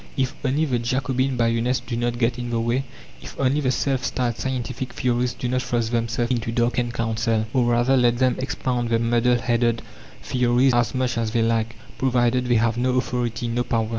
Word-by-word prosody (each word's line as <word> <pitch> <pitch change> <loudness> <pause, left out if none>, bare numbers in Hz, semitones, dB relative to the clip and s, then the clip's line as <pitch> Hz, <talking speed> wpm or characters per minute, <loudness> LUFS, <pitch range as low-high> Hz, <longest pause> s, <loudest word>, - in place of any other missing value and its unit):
If 130 -1 0
only 140 +4 +1
the 125 -5 0
Jacobin 130 +2 -1
bayonets 115 +2 +1
do 120 - -5
not 120 0 -1
get 120 0 0
in 120 0 -4
the 115 -1 0
way; 120 +4 0 0.4
if - - -10
only 140 +2 +2
the 130 - +1
self 130 0 0
styled 120 -3 -1
"scientific" 130 -1 -4
theorists 125 -1 0
do 125 - -2
not 125 +1 0
thrust 120 -2 -1
themselves 115 +1 -1
in 125 - +2
to 115 +1 -4
darken 120 0 0
counsel! 115 -1 0
Or 125 -2 +3
rather 120 +2 +3
let 120 -2 +3
them 130 0 +2
expound 125 -2 -2
their 115 - +3
muddle 120 +1 +2
headed 115 -1 0 0.4
theories 125 +1 +2
as 120 +2 +1
much 130 -2 0
as 115 -1 -1
they 115 0 +1
like, 115 0 0 0.2
provided 125 -1 +2
they 120 - +3
have 115 +1 +1
no 125 +1 +1
authority, 120 -2 -1
no 120 +1 0
power! 115 -2 -1
120 Hz, 200 wpm, -23 LUFS, 115-130 Hz, 0.4 s, Or